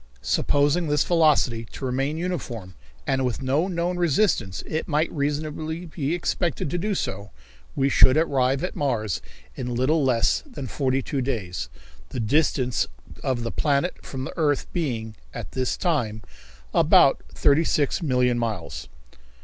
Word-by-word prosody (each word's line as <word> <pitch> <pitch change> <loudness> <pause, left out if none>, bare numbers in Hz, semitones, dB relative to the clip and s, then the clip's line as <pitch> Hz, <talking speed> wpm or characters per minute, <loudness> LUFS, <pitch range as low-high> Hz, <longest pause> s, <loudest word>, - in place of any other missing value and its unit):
Supposing 145 +4 +2
this 150 0 +2
velocity 150 -9 +3
to 135 - -5
remain 135 +4 -1
uniform, 125 - -4 0.3
and, 135 -1 +1
with 125 +1 -2
no 140 +7 +1
known 175 -1 -1
resistance, 170 - +1
it 155 - -3
might 155 +1 +1
reasonably 155 +3 -2
be 155 -1 -2
expected 170 -3 -1
to 175 - -1
do 205 +3 -1
so, 100 - -3 0.5
we 135 0 +2
should 130 0 +6
arrive 135 -3 +2
at 180 - -3
Mars 110 - -1 0.3
in 125 - -4
a 125 - -2
little 140 +6 +2
less 120 -4 +2
than 250 - -8
forty 130 +1 0
two 140 - -2
days, 95 - -3 0.4
the - - -5
distance 125 +1 +1 0.3
of 125 -3 -1
the 115 - -2
planet 145 +3 0
from 130 -1 -5
the - - -5
earth 145 -4 +1
being, 120 -10 -2 0.2
at - - -6
this 130 -1 -1
time, 120 - -1 0.5
about - - +5
thirty 145 +3 +4
six 150 +2 +1
million 125 -5 +2
miles. 85 - -4
140 Hz, 150 wpm, -24 LUFS, 125-160 Hz, 0.5 s, should